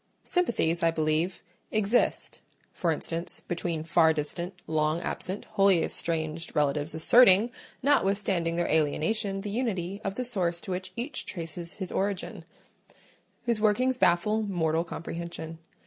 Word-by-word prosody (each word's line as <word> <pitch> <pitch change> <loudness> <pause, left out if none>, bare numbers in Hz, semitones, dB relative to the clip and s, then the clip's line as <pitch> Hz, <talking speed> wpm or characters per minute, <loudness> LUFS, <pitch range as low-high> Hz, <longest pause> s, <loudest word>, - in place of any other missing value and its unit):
Sympathies, 210 - +1
I 165 - +4
believe, 160 +2 0 0.3
exist 215 +3 +1 0.3
(for 175 - -1
instance, 165 +2 -4
between 170 -2 -2
far 160 0 +4
distant, 170 +4 -3
long 155 +1 +1
absent, 190 +3 -4
wholly 195 -4 +3
estranged 165 0 -2
relatives 150 +1 0
asserting, 220 +5 +6 0.3
notwithstanding 195 -10 +2
their 175 0 0
alienation, 195 +7 +1
the 205 0 -5
unity 200 -5 -2
of 195 -1 -3
the 250 - -2
source 180 -8 0
to - - -6
which 185 +1 -4
each 245 +6 -4
traces 170 -1 -5
his 190 -3 -4
origin) 195 -1 -2 1.0
whose 235 -3 0
workings 250 +4 +2
baffle 210 +5 +3
mortal 165 -5 0
comprehension. 165 -1 -6
175 Hz, 130 wpm, -28 LUFS, 165-205 Hz, 1.0 s, asserting